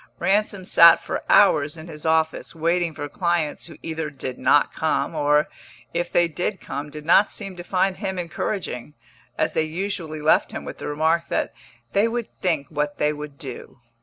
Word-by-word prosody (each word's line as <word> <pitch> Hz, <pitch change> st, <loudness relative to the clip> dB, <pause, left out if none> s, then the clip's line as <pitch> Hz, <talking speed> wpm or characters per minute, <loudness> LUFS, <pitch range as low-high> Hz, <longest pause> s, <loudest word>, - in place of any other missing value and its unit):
Ransom 200 Hz, -1 st, 0 dB
sat 170 Hz, -2 st, +8 dB
for -, -, -3 dB
hours 150 Hz, -6 st, +5 dB
in 160 Hz, -, -9 dB
his 155 Hz, -1 st, -6 dB
office, 160 Hz, +1 st, +1 dB
waiting 165 Hz, 0 st, 0 dB
for 145 Hz, -, -4 dB
clients 170 Hz, 0 st, -1 dB
who 165 Hz, -, -12 dB
either 160 Hz, -1 st, -3 dB
did 130 Hz, -3 st, -6 dB
not -, -, +3 dB
come, -, -, 0 dB
or, 150 Hz, +1 st, +2 dB, 0.5 s
if 175 Hz, +1 st, -2 dB
they 175 Hz, 0 st, +4 dB
did 175 Hz, +4 st, -3 dB
come, 140 Hz, +2 st, -6 dB
did 150 Hz, +1 st, -9 dB
not 185 Hz, +5 st, +5 dB
seem 195 Hz, -2 st, -5 dB
to 175 Hz, -, -6 dB
find 185 Hz, +1 st, 0 dB
him 190 Hz, -1 st, -3 dB
encouraging, 165 Hz, -, -4 dB, 0.4 s
as -, -, 0 dB
they -, -, +2 dB
usually 160 Hz, -1 st, -3 dB
left 150 Hz, +1 st, +3 dB
him -, -, -6 dB
with -, -, -8 dB
the -, -, -5 dB
remark 160 Hz, +3 st, +1 dB
that -, -, -1 dB, 0.4 s
they 205 Hz, +3 st, +4 dB
would 235 Hz, -1 st, -3 dB
think 160 Hz, -6 st, +1 dB
what 150 Hz, -1 st, -2 dB
they 150 Hz, 0 st, +1 dB
would 150 Hz, -1 st, -8 dB
do. 135 Hz, -3 st, -9 dB
160 Hz, 185 wpm, -23 LUFS, 150-180 Hz, 0.5 s, sat